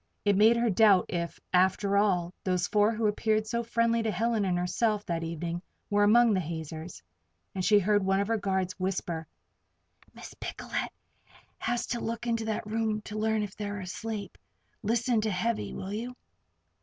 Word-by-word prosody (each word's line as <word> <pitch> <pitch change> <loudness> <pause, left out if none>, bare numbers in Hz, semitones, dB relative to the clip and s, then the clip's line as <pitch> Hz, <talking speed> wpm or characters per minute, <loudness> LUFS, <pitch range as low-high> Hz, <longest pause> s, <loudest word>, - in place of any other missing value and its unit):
It 205 -1 +4
made 220 +4 +6
her 235 -1 +2
doubt 195 -2 +5
if, 170 -1 -3
after 190 +2 +3
all, 185 -4 +2
those 180 -2 +1
four 210 +2 +3
who 225 0 -1
had 210 - +4
appeared 215 0 +1
so 235 +1 -1
friendly 230 0 +1
to 225 - -1
Helen 225 -1 0
and 180 -2 +1
herself 210 +4 0
that 165 -1 -2
evening, 170 +1 -4 0.3
were 205 0 +4
among 230 +2 +6
the 190 - +2
hazers; 160 - -6 0.5
and 185 - -3
she 210 +2 +5
heard 205 +1 +3
one 195 0 +2
of 200 - 0
her 225 0 +1
guards 190 -2 -1
whisper: 175 -3 -2 0.9
"Miss - - -10
Picolet - - -7 0.5
never - - -27 0.2
has 240 -1 -1
to 240 - -3
look 230 +1 -4
into 230 -1 0
that 220 -1 -2
room 215 0 -1
to 215 0 -5
learn 220 0 +1
if 200 -2 -6
they're 205 -1 -4
asleep. 200 +1 -6 0.4
Listen 230 +1 +1
to 215 - 0
Heavy, 215 +4 -1
will 190 +1 -5
you?" 240 +4 -4
210 Hz, 180 wpm, -29 LUFS, 185-225 Hz, 0.9 s, made